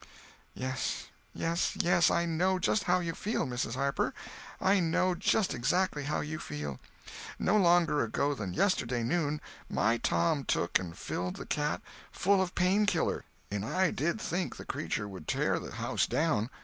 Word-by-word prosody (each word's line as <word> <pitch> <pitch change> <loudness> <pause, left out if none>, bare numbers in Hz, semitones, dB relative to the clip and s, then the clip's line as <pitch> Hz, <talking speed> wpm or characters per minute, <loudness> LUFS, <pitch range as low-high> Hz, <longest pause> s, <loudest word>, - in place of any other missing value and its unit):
"Yes, 130 0 -3 0.2
yes, 170 +1 0
yes, 175 0 +4
I 170 0 +2
know 180 +3 +1
just 185 +2 +1
how 180 0 +3
you 165 -1 -2
feel, 215 +6 -1
Mrs. 125 -2 -2
Harper, 140 +1 0 0.4
I 195 +1 +4
know 180 +2 +2
just 190 +3 +1
exactly 145 +4 0
how 150 - 0
you 155 +1 -4
feel. 75 -2 -5 0.6
No - - +2
longer 175 - +4
ago 140 +6 0
than 100 -9 -5
yesterday 125 - +1
noon, 150 +3 0 0.3
my 115 +2 +2
Tom 85 - +1
took 85 -7 +1
and 85 -3 -7
filled 90 +1 -3
the - - -7
cat 150 -1 -1 0.3
full 195 0 +3
of 185 -1 -2
Pain 190 +4 +3
killer, - - 0 0.3
and 100 -1 -2
I 185 - +1
did 170 +9 -1
think 180 -3 -2
the - - -9
cretur 130 -7 -2
would 95 -6 -9
tear - - +1
the - - -8
house - - 0
down. 140 -9 +1
155 Hz, 165 wpm, -31 LUFS, 120-180 Hz, 0.6 s, yes